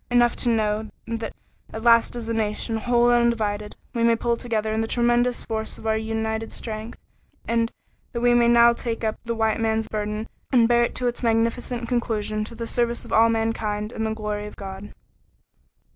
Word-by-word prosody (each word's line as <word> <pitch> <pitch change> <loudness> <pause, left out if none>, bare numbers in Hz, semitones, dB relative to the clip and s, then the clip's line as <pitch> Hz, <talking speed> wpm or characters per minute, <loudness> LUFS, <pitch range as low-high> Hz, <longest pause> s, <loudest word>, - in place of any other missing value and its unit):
Enough 240 -1 +4
to 245 - +1
know 215 -1 0 0.2
that 230 -1 -4 0.4
at 220 - -6
last 230 0 +5
as 235 -2 -5
a 230 - -1
nation, 220 0 -1
whole 240 +1 +3
and 240 0 +4
undivided, 210 -3 -1 0.2
we 235 - 0
may 230 0 +5
pull 235 +1 0
together 220 -2 -2
in 220 - 0
the 225 - -1
tremendous 240 +1 +2
force 220 -1 -3
of - - -12
our 220 0 +2
united 220 0 -2
strength, 220 0 -6 0.5
and 230 0 +1 0.4
that - - -6
now - - -5
we 245 0 +5
may 235 0 +6
take 235 -1 -4
up 220 -1 -1
the 230 0 -2
"White 220 -1 +1
Man's 220 -1 0
Burden" 210 +1 -3 0.2
and 240 -4 +5
bear 240 0 +4
it - - -2
to 250 - -1
its 240 0 -1
magnificent 235 +1 0
conclusion 215 -3 -1
to 230 - -10
the 230 - -4
service 235 0 0
of - - -7
all 230 +1 +6
mankind 225 -2 -1
and 220 - -3
the 220 0 -1
glory 210 -1 -3
of - - -11
God. 195 +1 -8
225 Hz, 200 wpm, -24 LUFS, 220-235 Hz, 0.5 s, may